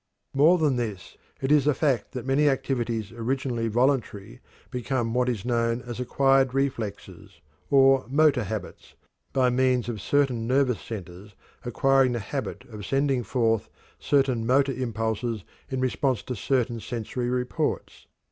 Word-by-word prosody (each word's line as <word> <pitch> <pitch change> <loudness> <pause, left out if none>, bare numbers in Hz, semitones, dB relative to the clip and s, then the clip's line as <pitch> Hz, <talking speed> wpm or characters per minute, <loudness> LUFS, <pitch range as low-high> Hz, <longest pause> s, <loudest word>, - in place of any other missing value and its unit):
More 155 +6 +5
than 150 -6 +1
this, 110 -6 -5 0.3
it 135 +1 0
is 150 -2 +4
a 150 - +3
fact 140 -6 0
that 125 -1 -5
many 140 +3 +3
activities 120 -5 -2
originally 120 0 -2
voluntary 115 - 0 0.3
become 125 -2 -2
what 125 0 +1
is 115 -4 -3
known 115 0 0
as 120 0 -7
"acquired 135 +1 +2
reflexes," 135 -7 -4 0.3
or 135 -2 +5
"motor 140 -4 +3
habits," 105 0 -7 0.4
by 130 -2 +2
means 125 -1 +2
of 110 -4 -4
certain 125 -2 +1
nervous 130 -2 +2
centers 100 -1 -9 0.3
acquiring 130 +2 +2
the 120 - -2
habit 130 +6 -5
of 105 -3 -8
sending 135 +2 +1
forth 115 -1 0 0.3
certain 135 -5 +1
motor 135 +4 +3
impulses 115 -3 -2 0.3
in 130 -2 -2
response 130 -2 0
to 125 - -5
certain 120 +1 0
sensory 120 +3 -4
reports. 125 0 -2
125 Hz, 140 wpm, -26 LUFS, 115-135 Hz, 0.4 s, More